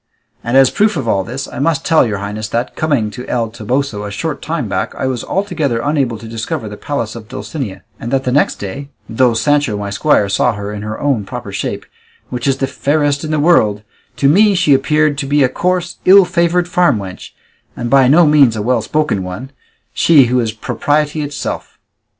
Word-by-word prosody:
And 120 +3 +1
as 135 -1 +6
a - - -10
proof 210 -2 +1
of 130 -5 -3
all 100 -3 +1
this, 125 +7 -5
I - - -8
must 155 +1 0
tell 160 -6 +4
your 105 -2 -2
highnesses 105 +2 -5
that, 120 +2 -2
coming 140 -9 0
to 125 +3 -8
El 115 -2 -1
Toboso 120 0 -2
a 105 - -5
short 140 +9 -4
time 155 -7 -3
back, 95 -2 -3
I - - -3
was 130 -3 -2
altogether 165 - -1
unable 135 -3 0
to 115 +1 -10
discover 110 -1 -4
the 105 - -7
palace 115 -2 -4
of 110 -2 -9
Dulcinea; 125 - -6 0.2
and 115 - -5
that 135 -1 +1
the 125 - -1
next 145 +3 +2
day, 135 +8 -7 0.2
though 120 +1 +2
Sancho, 145 -2 +1
my 100 0 -4
squire, 100 0 +2
saw 100 +5 +1
her 100 0 -6
in 105 - -6
her 105 +1 -5
own 135 -7 0
proper - - -7
shape, - - -4 0.5
which 125 +1 -3
is 135 -1 +2
the 135 - 0
fairest 145 +1 0
in 155 - -4
the 155 -1 0
world, 110 -11 +3 0.3
to 140 - +2
me 200 +7 +5
she 170 -5 +3
appeared 150 +2 +2
to 140 - -3
be 145 0 +3
a 130 - +3
coarse, 180 +4 -1
ill 195 0 +7
favoured 175 0 +1
farm 180 - +2
wench, 95 -2 -8 0.4
and 120 -1 -4
by 135 -2 +5
no 160 +6 +6
means 145 -6 +4
a 105 - -3
well 120 0 +1
spoken 150 -2 -1
one, 95 +9 -7 0.4
she 150 -6 +5
who 125 +1 +1
is 115 -2 -1
propriety 150 +7 -1
itself. 145 -1 -5
130 Hz, 215 wpm, -16 LUFS, 110-150 Hz, 0.5 s, ill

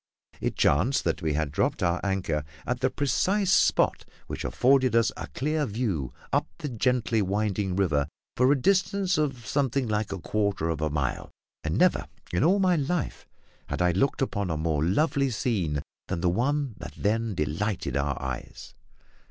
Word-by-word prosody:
It - - -2
chanced 95 - +2
that - - -1
we 80 -3 0
had 75 -1 -1
dropped 75 - 0
our 85 0 +1
anchor 95 -6 -1 0.2
at 125 0 -1
the 130 - +2
precise 185 +9 +1
spot - - +3 0.2
which - - -5
afforded 130 -2 +3
us 115 -1 +4
a - - -6
clear 150 +2 -1
view 100 - -2 0.2
up - - +2
the 150 - -4
gently 120 -2 +1
winding 100 -1 0
river 75 -8 +1 0.3
for 125 +2 +4
a 145 - +3
distance 190 +2 +2
of 135 -6 -1
something 135 +2 0
like 105 -1 -1
a 100 - -3
quarter 100 -3 -1
of 80 -2 -2
a 80 - +1
mile, 70 -3 -2 0.3
and - - -1
never - - +3 0.3
in 90 - +2
all 180 +6 +4
my 185 -3 +3
life 150 +3 -2 0.4
had - - -3
I 90 0 +3
looked 135 +9 +1
upon 100 -7 -2
a 80 - -1
more 80 -1 0
lovely 135 - +2
scene 95 - -1 0.2
than 85 - -2
the 90 - +3
one 135 +6 0
that - - -8
then 110 0 0
delighted 85 +6 -2
our 70 -1 0
eyes. 65 -2 -6
105 Hz, 175 wpm, -27 LUFS, 85-135 Hz, 0.4 s, us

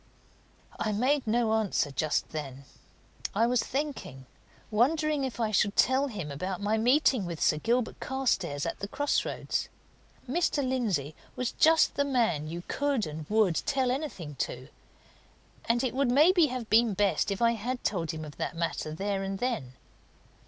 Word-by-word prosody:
I 215 - 0
made 260 +5 +1
no 225 0 +2
answer 210 -9 +1
just 150 +3 -1
then. 140 -3 -6 0.7
I 225 +3 +4
was 245 0 +2
thinking, 265 - -4 0.5
wondering 300 +6 +2
if 260 -2 -4
I 220 -2 0
should 205 0 +2
tell 265 +2 +3
him 195 - -5
about 185 +6 -4
my 205 +2 0
meeting 250 0 +3
with 170 -2 -5
Sir 150 - +2
Gilbert 235 +5 0
Carstairs 190 - -1
at - - -3
the 200 - -4
cross 290 +7 0
roads. - - -3 0.6
Mr. 285 -1 0
Lindsey 200 - -1 0.2
was 250 -2 -2
just 320 0 +4
the 285 - +1
man 230 - +1
you 170 +2 -6
could 285 -6 0
and 155 0 -7
would 210 -6 +3
tell 265 -3 +1
anything 255 - -4
to, 130 +3 -4 1.0
and 235 +2 +1
it 255 - -1
would 270 -1 +1
maybe 315 +6 +5
have 250 -3 -5
been 225 -1 +4
best 200 +1 +1
if 200 0 -2
I 235 0 +4
had 240 +3 -3
told 170 -6 -1
him 155 -2 -4
of 145 - -11
that - - -3
matter 165 -2 -2
there 195 +2 -2
and 195 0 -3
then. 210 - -2
220 Hz, 165 wpm, -29 LUFS, 175-260 Hz, 1.0 s, maybe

